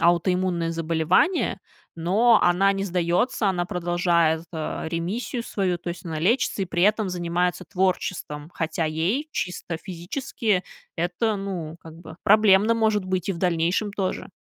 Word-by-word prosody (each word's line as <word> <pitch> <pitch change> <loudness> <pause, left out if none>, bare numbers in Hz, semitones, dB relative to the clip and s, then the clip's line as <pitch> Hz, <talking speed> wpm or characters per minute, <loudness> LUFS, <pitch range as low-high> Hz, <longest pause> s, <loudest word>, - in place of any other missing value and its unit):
аутоиммунное 175 0 +2
заболевание. 165 - +1 0.4
Но 210 +8 +4
она 190 +3 +4
не 195 0 -2
сдается, 180 +5 +1
она 180 -2 0
продолжает, 170 -2 +1
а, 160 0 -4
ремиссию 195 +9 -3
свою. 185 -3 -1
То - - -7
есть 175 - -8
она 160 -2 -4
лечится 215 +4 +1
и - - +1
при 175 0 -1
этом 210 0 +3
занимается 175 0 -1
творчеством. 180 -5 -2
Хотя 160 0 -2
ей 175 - -1
чисто 175 -1 -3
физически 195 +2 -2 0.3
это, 180 +6 0
ну, 180 -5 -5
как 160 -1 -12
бы, 160 -1 -11
проблемно 215 +1 +5
может 215 -3 +1
быть 185 0 -2
и - - +2
в 170 - -7
дальнейшем 175 +4 +1
тоже. 190 -2 -3
180 Hz, 145 wpm, -24 LUFS, 170-200 Hz, 0.4 s, проблемно